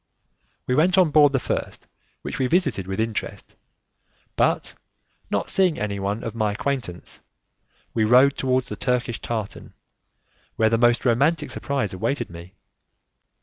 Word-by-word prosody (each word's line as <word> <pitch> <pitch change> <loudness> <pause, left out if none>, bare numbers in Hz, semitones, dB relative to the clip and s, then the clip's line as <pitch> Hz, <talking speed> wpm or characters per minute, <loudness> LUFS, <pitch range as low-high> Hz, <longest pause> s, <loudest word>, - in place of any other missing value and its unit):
We 125 - 0
went 175 +7 +3
on 180 -5 +4
board 145 -1 +6
the 135 - +1
first 125 - -4 0.4
which - - -5
we 130 - +2
visited 145 - 0
with 95 +1 -4
interest, 110 -1 -4 0.8
but - - +1 0.6
not - - -1
seeing 185 -4 +2
anyone 100 +1 -3
of 115 - -4
my 110 -2 0
acquaintance, 120 -7 -4 0.7
we 110 - +1
rowed 125 +5 +5
towards 130 -1 0
the - - -5
Turkish 125 -2 -1
tartan, 110 -4 -5 0.8
where 110 0 +2
the 115 - +2
most 120 +1 +3
romantic 145 +6 +2
surprise 135 -9 -2
awaited 115 +4 -2
me. 85 +3 -11
120 Hz, 140 wpm, -23 LUFS, 105-140 Hz, 0.8 s, board